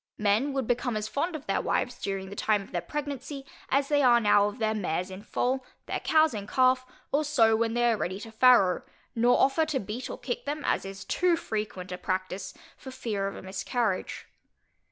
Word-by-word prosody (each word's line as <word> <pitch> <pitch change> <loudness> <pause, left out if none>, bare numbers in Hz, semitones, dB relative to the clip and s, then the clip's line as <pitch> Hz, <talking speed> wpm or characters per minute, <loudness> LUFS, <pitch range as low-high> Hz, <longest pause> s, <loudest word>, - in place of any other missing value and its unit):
Men 210 +7 +2
would 270 -2 -1
become 245 -1 0
as 210 0 -3
fond 325 +8 -2
of 295 - -7
their - - 0
wives, - - -1
during 195 -1 -3
the - - -6
time 210 -1 +1
of - - -16
their 175 - -1
pregnancy, 285 - -5 0.2
as 275 +1 +2
they 290 0 +3
are 245 -3 +6
now 205 -2 +4
of 210 - -6
their 220 -2 0
mares 185 -2 -2
in 190 +1 -8
foal, 255 +4 -1 0.2
their - - -2
cows 315 -3 +3
in 205 -2 -5
calf, 255 +1 +3 0.2
or 290 +2 +2
sows 225 -7 +3
when 230 0 0
they 240 0 +3
are 225 - +1
ready 185 0 -3
to 225 - -9
farrow; 220 -5 +5 0.3
nor 240 +2 +3
offer 275 +4 +3
to 295 -4 0
beat 215 +4 -5
or - - -5
kick 245 - -4
them 295 +1 -3
(as - - 0
is 195 0 -8
too 360 -1 +2
frequent 210 - -4
a 180 - -5
practice) 185 0 -3 0.2
for 265 - -10
fear 220 -6 -3
of 195 - -5
a - - -9
miscarriage. 195 +2 -2
230 Hz, 215 wpm, -28 LUFS, 200-270 Hz, 0.3 s, are